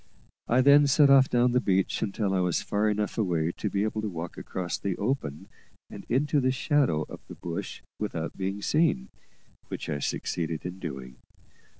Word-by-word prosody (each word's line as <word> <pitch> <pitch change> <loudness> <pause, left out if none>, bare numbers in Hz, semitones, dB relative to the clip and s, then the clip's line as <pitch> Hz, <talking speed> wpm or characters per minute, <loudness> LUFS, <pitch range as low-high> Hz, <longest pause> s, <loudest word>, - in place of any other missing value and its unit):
I 125 +2 +4
then 140 +2 +6
set 140 0 +5
off 135 -1 +6
down 120 0 +3
the 125 +1 +2
beach 95 -3 +1
until 100 -1 -1
I 95 - +2
was 90 -1 0
far 105 +1 +1
enough 105 +1 -1
away 85 -5 +1
to 105 - -4
be 100 +1 0
able 110 0 -1
to 105 - -2
walk 85 -2 -6
across 90 -1 -4
the 95 -3 -2
open 100 - -2 0.4
and - - -10
into 145 +4 +2
the 130 -1 +2
shadow 130 - +1
of - - -9
the - - -9
bush 85 -1 -6 0.2
without 85 -6 -3
being 95 +1 -3
seen, 150 - +1 0.6
which - - -6
I 75 - -2
succeeded 80 +3 -3
in 90 +1 -6
doing. 65 -7 -7
100 Hz, 185 wpm, -27 LUFS, 85-125 Hz, 0.6 s, then